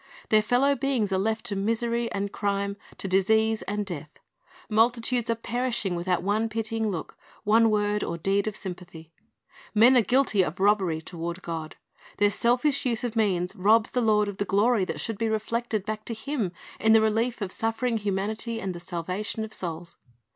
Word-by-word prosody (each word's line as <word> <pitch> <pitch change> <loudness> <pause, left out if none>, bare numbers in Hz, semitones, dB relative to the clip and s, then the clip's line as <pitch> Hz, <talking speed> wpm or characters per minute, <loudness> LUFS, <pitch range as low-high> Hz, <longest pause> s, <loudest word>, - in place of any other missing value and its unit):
Their 215 0 +5
fellow 250 +6 +3
beings 270 -7 0
are 190 - +1
left 220 +3 -1
to 210 -4 -2
misery 230 +3 0
and 200 0 -2
crime, 200 0 -1 0.2
to - - -5
disease 220 +4 +2
and 205 +1 -3
death. 160 -5 -7 0.5
Multi 230 +3 +3
tudes 240 0 -1
are 230 - +2
perishing 235 -4 -2
without 175 +1 -1
one 215 +3 +1
pitying 225 0 -2
look, 175 -6 -5 0.3
one 225 +2 +5
word 210 -1 +1
or 170 - -3
deed 195 +4 0
of 215 - -3
sympath}. 175 -4 -9 0.6
Men 235 +5 +7
are 245 - +7
guilty 245 -3 +3
of 175 0 -2
robbery 190 -5 +2
toward 170 +1 -6
(}od. 160 -2 -5 0.4
Their 205 0 +3
selfish 250 +6 +1
u.se 240 -2 -1
of 235 - -8
means 185 -5 +1
robs 215 +4 +3
the 250 - 0
Lord 210 -2 +3
of 200 -1 -5
the - - +2
glory 205 +1 +2
that - - -4
should 225 -3 -3
be 225 -1 +1
reflected 220 -1 -2
back 215 +1 -4
to 230 - -3
Him 225 -5 -2 0.3
in 220 +1 +4
the 225 - +7
relief 225 +3 +1
of 195 -4 -3
suffering 225 +2 -1
humanit)' 210 +3 -2
and 190 -4 -3
the 175 - -7
salvation 185 +5 -4
of 220 0 -7
souls. 170 -1 -6
215 Hz, 185 wpm, -26 LUFS, 190-230 Hz, 0.6 s, Men